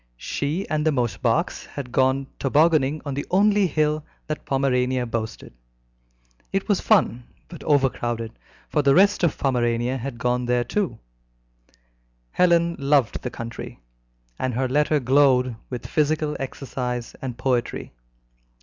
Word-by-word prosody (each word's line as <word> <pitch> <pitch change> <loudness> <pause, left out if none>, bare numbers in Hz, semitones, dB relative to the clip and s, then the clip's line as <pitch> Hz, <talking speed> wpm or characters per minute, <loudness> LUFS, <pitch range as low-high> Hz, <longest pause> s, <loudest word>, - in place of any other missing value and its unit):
She 150 - -3
and 155 -1 0
the 160 - +3
Mosebachs 125 -5 0
had 135 -4 -7
gone 130 +2 +2
tobogganing 150 0 +2
on 140 - -3
the 140 - -4
only 205 +1 +4
hill 155 -1 0 0.2
that 155 - -5
Pomerania 130 -2 +1
boasted. 110 - -5 1.0
It 195 0 -1
was 205 -3 +2
fun, 125 - +2 0.2
but 170 - -10
overcrowded, 120 -5 +1 0.4
for 150 - +1
the 140 -1 +4
rest 200 +3 +4
of 170 - +2
Pomerania 125 -1 0
had 125 0 -5
gone 125 +1 0
there 120 0 +2
too. 155 - -2 1.3
Helen 170 -1 +3
loved 140 -5 +2
the - - -3
country, 115 0 -7 0.6
and 130 -2 -1
her 130 +1 +1
letter 150 +3 +2
glowed 130 -2 +3
with 125 -3 -6
physical 150 0 0
exercise 125 -3 -4
and 125 -3 -5
poetry. 125 - -1
135 Hz, 130 wpm, -23 LUFS, 125-155 Hz, 1.3 s, only